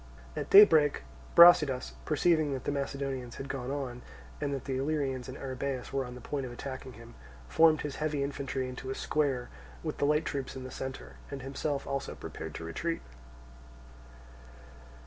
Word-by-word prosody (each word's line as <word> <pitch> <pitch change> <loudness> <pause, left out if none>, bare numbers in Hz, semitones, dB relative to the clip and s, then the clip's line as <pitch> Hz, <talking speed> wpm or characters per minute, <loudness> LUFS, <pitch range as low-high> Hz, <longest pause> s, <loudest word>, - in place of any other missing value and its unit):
At - - -4
daybreak 160 -8 +7 0.3
Brasidas, 155 -7 +7
perceiving 155 -1 +2
that 130 - -4
the - - -1
Macedonians 135 -3 -3
had 135 - -6
gone 130 -2 -4
on, 135 -3 -4 0.4
and 145 -1 -1
that 135 -2 -4
the 135 -2 -2
Illyrians 135 -3 -1
and 130 - -7
Arrhabaeus 130 -1 -4
were 135 -1 0
on 125 0 -8
the 125 - -10
point 140 +3 -3
of 125 - -5
attacking 130 +1 -7
him, 115 0 -13 0.3
formed 155 - +5
his 145 -2 -4
heavy 150 -2 -1
infantry 135 -2 -3
into 130 +1 -7
a 135 - -2
square, 135 -5 0 0.3
with - - -4
the - - +2
light 150 +2 +2
troops 135 -3 -4
in 130 - -6
the 130 - -7
centre, 130 0 -7
and 135 -2 -6
himself 140 +1 -3
also 140 0 -3
prepared - - -7
to - - -6
retreat. 165 - -3
135 Hz, 170 wpm, -30 LUFS, 130-145 Hz, 0.4 s, daybreak